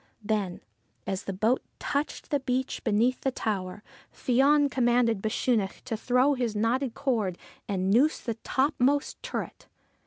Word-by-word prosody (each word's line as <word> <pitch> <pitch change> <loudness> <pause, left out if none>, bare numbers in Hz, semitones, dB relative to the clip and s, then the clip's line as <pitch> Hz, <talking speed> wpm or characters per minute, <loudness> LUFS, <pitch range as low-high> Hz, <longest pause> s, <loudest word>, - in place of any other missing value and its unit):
Then, 205 -4 -1 0.4
as 190 0 -3
the - - -2
boat 220 +7 +1 0.2
touched 285 +1 -3
the 285 - +2
beach 260 0 -2
beneath 235 +3 +2
the 270 - +1
tower, 205 -5 -3 0.3
Fion 280 +4 +3
commanded 240 -4 +2
Bechunach 215 -2 0
to 230 - -3
throw 250 +5 +3
his 245 -5 -2
knotted 230 +3 0
cord 220 -10 0 0.3
and 190 -1 0
noose 275 +9 +4
the 230 - -3
topmost 270 +4 0
turret. - - -5
240 Hz, 135 wpm, -28 LUFS, 210-265 Hz, 0.4 s, noose